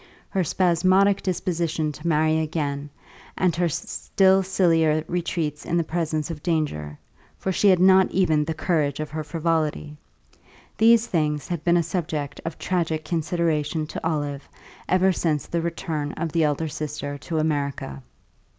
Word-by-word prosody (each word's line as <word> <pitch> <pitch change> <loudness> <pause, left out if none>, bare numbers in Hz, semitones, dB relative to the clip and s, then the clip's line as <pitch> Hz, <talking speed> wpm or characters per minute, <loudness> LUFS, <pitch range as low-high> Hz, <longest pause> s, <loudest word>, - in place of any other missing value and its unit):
her 190 -2 0
spasmodic 185 +4 +3
disposition 170 -4 -1
to 150 +3 -7
marry 155 0 +2
again, 150 -2 -2 0.5
and 180 -3 +2
her 175 0 +1
still 190 +5 +2
sillier 165 -5 +2
retreats 165 -4 -2
in 170 - -1
the 170 - +2
presence 155 -1 -2
of 150 -2 -7
danger 145 - -2 0.4
(for 190 - -2
she 190 +3 +2
had 185 - +6
not 190 +1 +6
even 160 -5 +2
the 160 +2 -3
courage 155 -4 0
of 155 - -4
her 155 0 -3
frivolity), 155 -2 -1 0.8
these 230 +1 +5
things 150 -7 -1
had 170 -4 -4
been 175 0 +4
a 170 - +2
subject 155 -4 -3
of 165 -1 -4
tragic 165 -4 -1
consideration 160 -2 -1
to - - -6
Olive 145 -3 -2 0.4
ever 185 +1 +4
since 155 -5 -1
the 170 - -2
return 160 -3 -3
of 170 -2 -3
the 165 +1 +2
elder 150 +2 0
sister 150 -1 -5
to 160 +3 -4
America. 140 - -2
160 Hz, 150 wpm, -24 LUFS, 150-175 Hz, 0.8 s, had